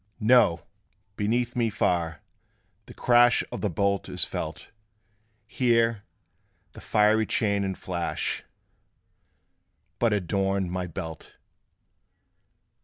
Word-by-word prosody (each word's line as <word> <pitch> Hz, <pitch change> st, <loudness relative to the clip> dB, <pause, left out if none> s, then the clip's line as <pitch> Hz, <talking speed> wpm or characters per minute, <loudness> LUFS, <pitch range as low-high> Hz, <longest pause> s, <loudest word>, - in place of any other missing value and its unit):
"No: 110 Hz, -7 st, +4 dB, 0.5 s
beneath 120 Hz, +4 st, -1 dB
me 120 Hz, -2 st, +1 dB
far, 85 Hz, -6 st, -1 dB, 0.6 s
the -, -, -11 dB
crash 120 Hz, 0 st, +4 dB
Of -, -, -5 dB
the 105 Hz, -, 0 dB
bolt 100 Hz, +3 st, -1 dB
is -, -, +2 dB
felt: -, -, -6 dB, 0.7 s
Here, 115 Hz, -3 st, +1 dB, 0.7 s
the -, -, -13 dB
fiery 110 Hz, +1 st, +2 dB
chain 100 Hz, -3 st, +1 dB
and 95 Hz, -1 st, -3 dB
flash 85 Hz, -2 st, -3 dB, 1.6 s
But 115 Hz, -2 st, +2 dB
adorn 95 Hz, -1 st, 0 dB
my 90 Hz, 0 st, -3 dB
belt." 80 Hz, -2 st, -8 dB
100 Hz, 100 wpm, -26 LUFS, 90-115 Hz, 1.6 s, No